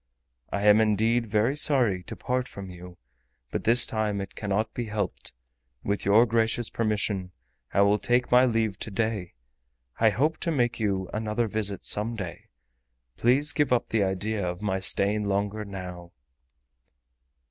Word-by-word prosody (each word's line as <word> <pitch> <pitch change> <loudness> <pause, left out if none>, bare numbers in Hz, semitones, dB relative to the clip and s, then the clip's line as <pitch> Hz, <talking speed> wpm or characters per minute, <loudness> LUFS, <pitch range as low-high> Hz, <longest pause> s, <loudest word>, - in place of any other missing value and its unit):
I 100 - -2
am 105 +1 +6
indeed 110 +2 +1
very 110 +6 +1
sorry 125 -10 +4
to - - -7
part 125 0 -2
from 95 -2 -9
you, 90 0 -12 0.5
but - - -4
this 120 +2 +6
time 110 -2 -2
it 100 - -6
cannot 105 +2 -2
be 120 - -4
helped. 105 -4 -4 0.5
With 100 0 -2
your 105 +4 +5
gracious 115 0 0
permission, 105 -4 -2 0.4
I 100 - +2
will 100 +1 +3
take 125 +3 +1
my 125 +1 +6
leave 110 -5 0
to - - -4
day. 105 - -2 0.6
I 110 - +5
hope 150 +9 0
to - - -2
make 120 -5 0
you 95 -3 -1
another 110 +2 -1
visit 100 -2 -2
some 110 +3 0
day. 95 -6 -7 0.7
Please 135 +6 +2
give 145 -4 +1
up 125 -2 +1
the 110 -2 +1
idea 100 +2 -1
of 90 0 -3
my 95 -2 -1
staying 100 +2 0
longer 100 +2 -1
now." 90 -3 -8
105 Hz, 160 wpm, -26 LUFS, 100-115 Hz, 0.7 s, am